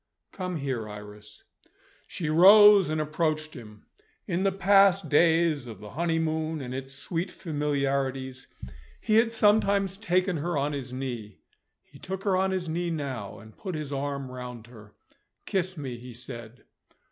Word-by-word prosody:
"Come 180 -2 -4
here, 130 -7 -3
Iris." 105 0 -11 0.6
She 160 - -5
rose 195 +3 +7
and 155 0 -1
approached 155 0 -1
him. 105 -4 -12 0.4
In 180 -2 -1
the 195 0 +2
past 195 0 +4
days 160 -3 +3
of 110 -5 -9
the 105 0 -10
honeymoon 160 0 -1
and 125 -2 -6
its 135 0 -6
sweet 170 +6 -4
familiarities, 140 -5 -2 0.5
he 215 -1 +2
had 230 0 +4
sometimes 200 -3 +2
taken 185 -3 0
her 170 +1 -2
on 145 +1 0
his 130 -3 -5
knee. 120 -6 -6 0.5
He - - -18
took 190 +1 -6
her 195 -3 +2
on 190 +1 +2
his 185 -2 -2
knee 170 +2 -2
now, 135 -10 -4
and 110 0 -14
put 185 -4 -6
his 150 -2 -5
arm 140 -1 -3
round 125 -2 -8
her. 110 -4 -15 0.5
"Kiss 185 -1 -2
me," 130 -5 -6
he 125 0 -10
said. 120 0 -10
155 Hz, 155 wpm, -27 LUFS, 125-185 Hz, 0.6 s, rose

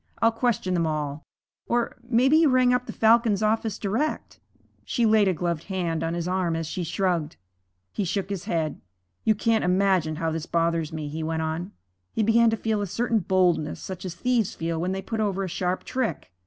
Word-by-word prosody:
I'll 230 - +4
question 225 -5 0
them 170 -2 +1
all. 150 -1 -3 0.5
Or 240 0 0
maybe 245 +4 +3
you 320 -2 +5
rang 255 -1 +4
up 250 0 0
the - - -4
Falcon's 225 -2 +3
office 220 -1 0
direct.' 225 +10 -2 0.4
She 240 - 0
laid 215 -2 +4
a 190 - +3
gloved 170 -1 -2
hand 175 -4 -2
on 165 +1 -1
his 170 0 -3
arm 180 -2 0
as 165 0 -2
she 175 +3 -4
shrugged. 170 -2 -1 0.6
He - - -2
shook 195 +2 -2
his 195 -2 -4
head. 160 -7 -2 0.4
'You 215 - +4
can't 225 +1 +1
imagine 180 -3 +2
how 165 0 -1
this 160 0 -4
bothers 165 -1 0
me,' 155 -2 -4
he 155 +2 -5
went 160 0 -1
on. 165 +4 -3 0.4
He 220 - +1
began 230 +2 +5
to 225 - 0
feel 220 -1 -1
a 200 - -2
certain 230 +4 0
boldness, 180 -5 +1
such 185 -2 -7
as 180 -3 -5
thieves 235 0 0
feel 165 0 -2
when 180 +2 -1
they 190 0 -3
put 225 - -4
over 195 -2 0
a - - -2
sharp 180 +1 -2
trick. 255 - -3
190 Hz, 205 wpm, -25 LUFS, 165-225 Hz, 0.6 s, you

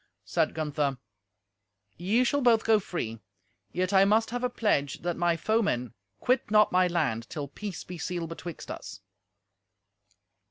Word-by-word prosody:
Said - - 0
Gunther, 150 -3 -1 1.0
"Ye 205 +9 +2
shall 285 +3 +1
both 235 -3 +4
go 220 -1 +4
free. 115 - -4 0.5
Yet 185 +2 -1
I 190 0 +7
must 220 +3 +3
have 245 +1 -3
a 250 - +2
pledge 155 - 0
that 175 -1 -1
my 175 -1 +1
foemen 180 - 0 0.3
quit 250 -3 +1
not 210 0 +5
my 185 0 +4
land 140 -10 -1
till 145 -2 -4
peace 195 +6 -6
be 180 -1 -8
sealed 170 0 -3
betwixt 165 0 -7
us." 95 +1 -8
180 Hz, 150 wpm, -28 LUFS, 150-215 Hz, 1.0 s, I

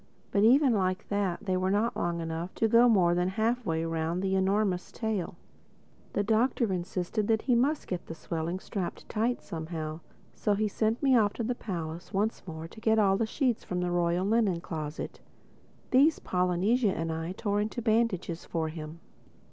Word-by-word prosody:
But 200 - +3
even 260 +3 +6
like 185 -3 0
that, 200 -1 -1
they 185 -2 +1
were 185 +1 +1
not 210 +4 +1
long 170 0 -1
enough 165 +2 -4
to 225 - +2
go 235 +2 +6
more 180 -6 +4
than 180 +1 +1
halfway 220 -5 0
round 165 +2 -1
the 190 0 0
enormous 190 -1 +1
tail. 215 -7 -3 0.8
The 205 - +1
Doctor 225 0 +2
insisted 185 +3 -2
that 220 -1 +2
he 255 - +2
must 275 +6 +2
get 180 -2 -5
the 165 - -6
swelling 165 +2 -3
strapped 190 -2 -5
tight 230 +3 -1
somehow. 160 -1 -5 0.3
So 210 - 0
he 215 +1 +1
sent 220 +5 -1
me 270 -2 +5
off 210 -3 +3
to 235 - -3
the 245 +3 0
palace 175 -5 -6
once 210 +2 0
more 160 -1 -6
to 220 - -14
get 220 0 +3
all 195 -3 +4
the 220 +3 0
sheets 250 -1 0
from 180 - -3
the 180 0 -1
Royal 175 +1 +1
Linen 210 -5 +2
closet. 155 -2 -5 0.7
These 285 +5 +5
Polynesia 185 +5 +1
and 165 0 -2
I 165 +2 -3
tore 205 0 -1
into 215 +3 -3
bandages 220 -7 0
for 160 -2 -2
him. 155 +1 -8
190 Hz, 180 wpm, -29 LUFS, 170-220 Hz, 0.8 s, even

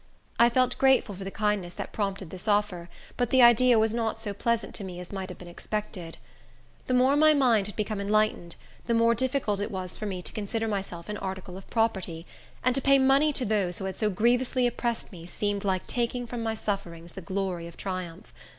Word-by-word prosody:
I 235 0 +7
felt 255 +1 +1
grateful 265 -6 +4
for 195 +1 -7
the 195 - -4
kindness 205 -4 -1
that - - -6
prompted 195 -4 -3
this 185 +3 -8
offer, 205 -4 +1 0.3
but 245 -2 +1
the 260 -1 +5
idea 240 0 +6
was 220 0 +2
not 225 -1 -1
so 210 -2 -4
pleasant 230 +3 -1
to 205 - -3
me 180 -2 -7
as 180 - -9
might 190 -1 -5
have 180 - -8
been 180 - -11
expected. 180 -2 -5 0.7
The 255 - +2
more 260 +3 +4
my 310 +1 +6
mind 235 -8 +3
had 210 - -8
become 210 -1 -2
enlightened, 210 -4 +1 0.3
the 235 - +2
more 230 0 +4
difficult 250 -4 0
it 205 - -2
was 185 -2 -5
for 215 - -3
me 185 -3 -4
to - - -6
consider 220 +2 -2
myself 190 -5 -4
an 210 0 -4
article 190 -2 -6
of 190 - -11
property; 190 -7 -1 0.4
and 255 - +3
to 270 - 0
pay 275 +1 +5
money 270 +3 +4
to 270 -3 -1
those 200 -5 0
who 190 - -4
had 190 - -5
so 215 - +2
grievously 245 +5 +2
oppressed 240 -1 -2
me 170 -3 -10
seemed 205 +2 -1
like 190 -2 0
taking 245 0 -2
from 235 0 -5
my 225 -1 -1
sufferings 175 -6 -4
the 190 - -7
glory 185 -1 -3
of 170 - -13
triumph. 185 -2 -6
210 Hz, 215 wpm, -27 LUFS, 190-235 Hz, 0.7 s, I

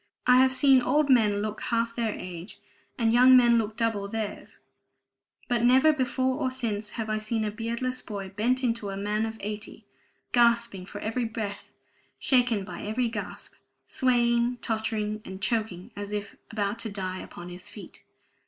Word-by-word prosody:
I 250 0 +6
have 260 0 +5
seen 265 -1 +5
old 280 +3 +2
men 210 -5 +4
look 215 0 -4
half 230 0 0
their 230 -3 -1
age, 180 +1 -8 0.4
and 225 -1 +2
young 255 +2 +8
men 240 -2 +5
look 220 0 -3
double 225 -4 0
theirs; 215 0 -5 0.9
but 240 -2 +1
never 260 +6 +6
before 260 -1 0
or 260 - +1
since 220 -5 -2
have 225 -1 -2
I 215 0 -1
seen 215 0 -2
a 210 - -2
beardless 235 +3 -3
boy 200 -2 -6
bent 240 +7 0
into 230 -4 0
a 195 - -5
man 210 +2 -1
of 225 0 -7
eighty, 210 +1 -6 0.5
gasping 235 -5 +2
for - - -8
every 230 +3 -1
breath, 210 -3 -5 0.5
shaken 245 -6 +2
by - - -7
every 230 +3 -1
gasp, 215 -3 -7 0.3
swaying, 240 -1 +2
tottering, 220 -2 -2
and 190 0 -8
choking, 195 -3 -2
as 205 0 -6
if 205 -1 -4
about 205 0 -2
to 225 - -2
die 185 -2 -4
upon 175 0 -9
his 180 +1 -9
feet. - - -12
225 Hz, 170 wpm, -27 LUFS, 205-245 Hz, 0.9 s, young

